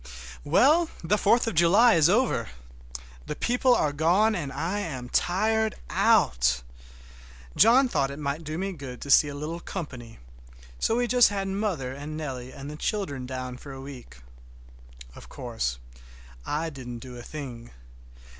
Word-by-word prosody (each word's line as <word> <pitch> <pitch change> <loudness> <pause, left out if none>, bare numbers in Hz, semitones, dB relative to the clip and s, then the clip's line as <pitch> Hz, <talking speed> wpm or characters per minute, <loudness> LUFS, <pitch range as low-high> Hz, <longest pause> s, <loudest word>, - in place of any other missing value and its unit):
Well, 305 - +4
the 185 +5 +2
Fourth 210 +3 +3
of 225 - -2
July 190 +8 +5
is 160 0 +4
over! 205 - +1 0.8
The - - -4
people 245 - +2
are 150 -9 +1
gone 180 +9 +3
and 155 -8 -3
I 175 +8 -2
am 130 -11 -5
tired 220 +7 +1 0.2
out. 60 0 +3 0.9
John 255 +4 +6
thought 135 - 0
it 140 - -7
might 150 +2 -3
do 155 +1 -5
me 195 +2 -2
good 135 -7 -8
to 140 - -3
see 150 - +7
a 145 - -6
little 155 +4 -5
company, 130 -11 -7 0.6
so 225 - +1
we 245 +1 +1
just 245 -2 +5
had 195 -1 -3
mother 190 -10 -2
and 145 +3 -7
Nellie 130 -5 -6
and 135 +1 -9
the 150 +1 -7
children 145 - -3
down 130 -1 -5
for 140 +1 -10
a 135 - -9
week. 135 - -10 1.0
Of - - -13
course - - -3 0.7
I 160 +2 -2
didn't 125 -4 -8
do 125 -1 -9
a 120 - -8
thing. 120 -4 -8
155 Hz, 160 wpm, -26 LUFS, 130-205 Hz, 1.0 s, see